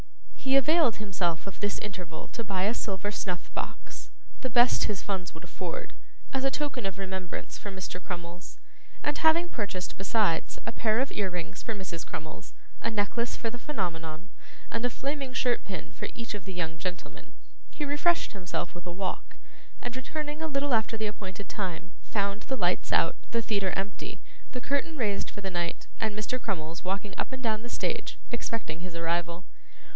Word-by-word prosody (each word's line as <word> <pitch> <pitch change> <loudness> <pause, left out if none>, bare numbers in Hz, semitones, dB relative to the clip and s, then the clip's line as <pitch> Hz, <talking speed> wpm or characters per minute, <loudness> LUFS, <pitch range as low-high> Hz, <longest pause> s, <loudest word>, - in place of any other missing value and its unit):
He 270 0 +3
availed 300 -2 +6
himself 185 -5 0
of 195 - -6
this 205 0 +1
interval 180 -5 -5
to 230 - -3
buy 190 -3 +1
a 210 +4 +4
silver 205 -3 -1
snuff 180 -4 -2
box - - -4 0.3
the 255 - 0
best 240 +1 +6
his 205 -3 -1
funds 190 -3 -1
would 160 - -8
afford - - -4 0.4
as 265 0 +2
a 270 - +6
token 270 -3 -1
of 195 - -3
remembrance 190 -2 -3
for 205 - -4
Mr. 190 -1 -4
Crummles, 175 -1 -5 0.5
and 295 - +3
having 330 +2 +7
purchased 200 - -2
besides 195 -4 +3
a - - 0
pair 220 0 +3
of 270 - +2
ear 200 -2 +1
rings 175 -2 -3
for 225 - -2
Mrs. 180 -5 -3
Crummles, 155 0 -6 0.3
a - - +2
necklace 225 +2 +1
for 230 - 0
the 245 - -6
Phenomenon, 175 - -2 0.4
and 230 - 0
a 245 - +4
flaming 275 +1 -2
shirt 250 -2 +3
pin 190 -2 -5
for - - -3
each 230 -1 -3
of 205 -3 -5
the 190 - -4
young 165 -2 -1
gentlemen, 185 -1 -4 0.4
he 295 - -2
refreshed 295 +4 +4
himself 180 -3 -2
with 175 +1 -8
a - - -1
walk, 185 +2 -2 0.5
and 245 0 -2
returning 300 +3 -3
a 320 - +1
little 280 -2 +2
after 225 0 +3
the 220 - 0
appointed 200 -1 -4
time, 190 -1 -2
found 200 0 0
the 265 +4 -1
lights 180 -4 +2
out, 165 - +5
the 230 0 +2
theatre 200 -4 +2
empty, 195 +1 -3 0.3
the 250 - -2
curtain 285 +5 +1
raised 210 -6 +1
for 205 - -6
the 190 -1 -2
night, 175 -1 -1
and 215 -1 +1
Mr. 240 +4 0
Crummles 170 -5 -2
walking 195 +2 -1
up - - 0
and 260 0 -4
down 220 -2 +2
the 240 - -6
stage - - -1
expecting 225 -8 -1
his 175 -1 -5
arrival. 170 +1 +1
205 Hz, 185 wpm, -31 LUFS, 180-245 Hz, 0.5 s, having